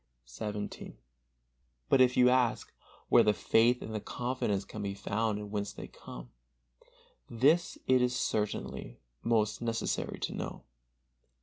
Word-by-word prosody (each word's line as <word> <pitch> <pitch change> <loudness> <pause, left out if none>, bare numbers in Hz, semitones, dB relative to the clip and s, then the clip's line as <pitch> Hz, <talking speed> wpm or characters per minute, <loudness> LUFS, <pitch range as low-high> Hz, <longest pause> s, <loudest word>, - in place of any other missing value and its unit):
XVII. 105 - -6 0.9
But 135 - +5
if 125 0 +4
you 125 0 +7
ask, 125 -2 +1 0.4
where - - +7
the 105 - +3
faith 115 +7 +3
and 110 - -6
the 110 - -1
confidence 115 -4 -2
can 110 - -7
be 100 -1 -3
found 105 +1 -1
and 105 -1 -7
whence 100 -1 -3
they - - -8
come, - - -11 1.0
this 145 +9 +2
it 130 -1 +4
is 125 0 +1
certainly 105 - -2 0.2
most 110 -2 +1
necessary 115 -1 -2
to - - -2
know. - - -5
110 Hz, 135 wpm, -31 LUFS, 105-125 Hz, 1.0 s, you